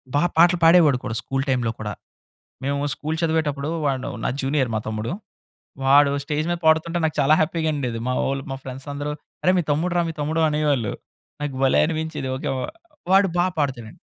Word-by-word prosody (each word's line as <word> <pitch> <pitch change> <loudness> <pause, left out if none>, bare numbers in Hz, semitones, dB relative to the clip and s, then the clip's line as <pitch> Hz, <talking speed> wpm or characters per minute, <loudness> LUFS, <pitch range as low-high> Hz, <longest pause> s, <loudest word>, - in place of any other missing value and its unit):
బాగా 175 +5 +3
పాటలు 175 +1 +5
పాడేవాడు 165 -5 +6
కూడా 115 - -3
స్కూల్ 135 +3 -2
టైమ్‌లో 125 -3 +1
కూడా. 105 -1 -4 0.7
మేము 140 0 -1
స్కూల్ 155 +5 -3
చదివేటప్పుడు 155 -3 0 0.2
వాడు 135 -1 -1 0.2
నా - - +1
జూనియర్ 135 -3 0
మా 110 - 0
తమ్ముడు. 110 +1 -3 0.8
వాడు 140 +1 +6
స్టేజ్ 150 +2 -2
మీద 175 - 0
పాడుతుంటే, 160 +2 +3
నాకు 155 - -1
చాలా 145 +2 +4
హ్యాపీ‌గా 160 0 0
ఉండేది 125 -5 -3
మా 125 - +1
ఓళ్ళు, 135 0 -2
మా - - -2
ఫ్రెండ్స్ 130 +2 -8
అందరూ 145 +1 -3 0.3
"అరే! 185 - +5
మీ - - 0
తమ్ముడు 165 +5 0
రా 175 - +4
మీ - - -4
తమ్ముడు" 155 +2 0
అనేవాళ్ళు. 145 -7 0 0.5
నాకు 145 -2 -3
భలే 135 - +4
అనిపించేది 155 -4 -3
ఓకె 130 - -4
వ - - -3 0.5
వాడు 195 +1 +6
బాగ 180 +1 +3
పాడుతాడండి. 125 -6 -3
145 Hz, 185 wpm, -23 LUFS, 135-160 Hz, 0.8 s, పాడేవాడు